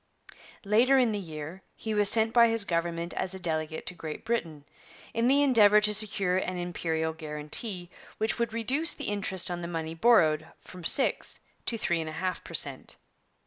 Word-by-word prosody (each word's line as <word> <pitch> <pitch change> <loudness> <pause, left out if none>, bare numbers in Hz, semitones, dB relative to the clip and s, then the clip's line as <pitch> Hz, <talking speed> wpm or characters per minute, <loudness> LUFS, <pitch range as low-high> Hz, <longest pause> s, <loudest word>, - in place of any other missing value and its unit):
Later 235 +7 +4
in 245 -4 +3
the 205 - -2
year 160 0 -8
he 220 - -5
was 205 -1 +3
sent 225 0 +3
by 235 -1 +6
his 225 -2 +1
government 170 0 -2
as 190 0 -4
a - - -4
delegate 160 -2 -3
to - - -5
Great 160 -3 -8
Britain, 165 -11 -3 0.5
in 230 +1 +1
the 280 +2 +4
endeavour 210 -6 +6
to 210 0 +2
secure 195 -3 0
an 185 -1 -3
Imperial 165 -2 -2
guarantee, 160 +5 -2 0.3
which 220 +2 -1
would 235 0 -1
reduce 260 +8 0
the - - -9
interest 190 -3 -1
on 175 0 -4
the 170 - -5
money 165 -1 -4
borrowed 160 -6 +3
from 180 -1 -13
six 265 +10 +4 0.3
to 230 - -1
three 175 -6 -1
and 160 - -5
a - - -8
half 185 +2 -3
per - - -8
cent. - - -2
185 Hz, 185 wpm, -28 LUFS, 165-225 Hz, 0.5 s, by